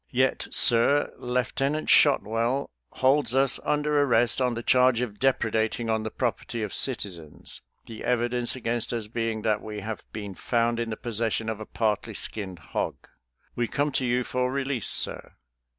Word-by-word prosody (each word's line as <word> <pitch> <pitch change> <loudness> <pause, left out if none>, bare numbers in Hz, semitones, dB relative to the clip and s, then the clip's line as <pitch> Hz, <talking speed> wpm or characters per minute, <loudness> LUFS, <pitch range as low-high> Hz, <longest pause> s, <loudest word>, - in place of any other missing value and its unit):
Yet, 130 +1 +1
sir, 135 +3 +4
Lieutenant 130 +4 -1
Shotwell 125 -1 +3 0.2
holds 130 -1 +2
us 135 -1 +3
under 150 0 +1
arrest 120 -2 +3
on 125 -2 +1
the 115 - -5
charge 125 -1 +4
of 110 -5 -4
depredating 115 -3 +1
on 110 0 +1
the 110 - -3
property 120 -1 -3
of 105 - -4
citizens, 90 - -5 0.2
the 110 -1 -9
evidence 120 0 0
against 120 -1 -2
us 115 -2 -2
being 115 0 -3
that 105 -2 +1
we 105 -1 -6
have 110 +2 -5
been 105 -2 -6
found 115 +3 0
in 115 -1 -2
the 110 - -4
possession 115 -1 -2
of 110 -1 -4
a 110 - -8
partly 110 -3 -1
skinned 95 -4 -6 0.2
hog. - - -1 0.6
We 120 -1 0
come 145 +4 0
to 130 - -1
you 125 0 +1
for 125 +1 -1
release, 135 -4 -2
sir. - - -2
120 Hz, 165 wpm, -26 LUFS, 110-130 Hz, 0.6 s, sir